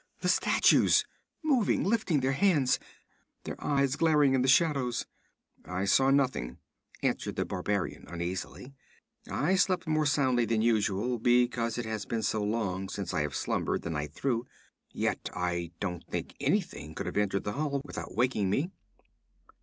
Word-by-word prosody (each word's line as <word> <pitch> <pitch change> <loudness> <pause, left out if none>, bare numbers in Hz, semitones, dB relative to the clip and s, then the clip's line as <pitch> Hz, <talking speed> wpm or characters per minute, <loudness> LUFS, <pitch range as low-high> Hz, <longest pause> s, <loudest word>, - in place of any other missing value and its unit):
The - - +1
statues, - - +4 0.4
moving, 265 -9 +2
lifting 195 -8 +1
their 130 +1 +1
hands, 145 -4 +3 0.6
their - - -7
eyes 140 -2 +1
glaring 150 -4 +4
in 130 - +3
the 130 - +1
shadows?' 135 -3 +2 0.6
'I 90 +2 -3
saw 135 +7 +4
nothing,' 130 - +1 0.5
answered - - -1
the - - -1
barbarian 100 0 -2
uneasily. 90 +9 -5 0.6
'I 165 +7 +1
slept 185 -1 +2
more 155 -1 +1
soundly 130 -4 +2
than 110 -1 +1
usual, 110 +1 +1
because 120 -1 +2
it 120 - -3
has 110 -1 -4
been 115 -1 -2
so 110 +1 0
long 100 -3 -2
since 100 -2 -4
I 80 - +1
have 75 -1 -3
slumbered - - -1
the 85 - -3
night 75 -1 -4
through; 125 -3 -1 0.4
yet - - -2
I 85 -1 -2
don't 90 -4 -3
think - - -4
anything - - -1
could - - -4
have - - -5
entered 100 -1 +1
the 105 - -3
hall 140 0 -1
without - - -7
waking 115 -5 +1
me.' 145 - 0
120 Hz, 155 wpm, -29 LUFS, 100-140 Hz, 0.6 s, statues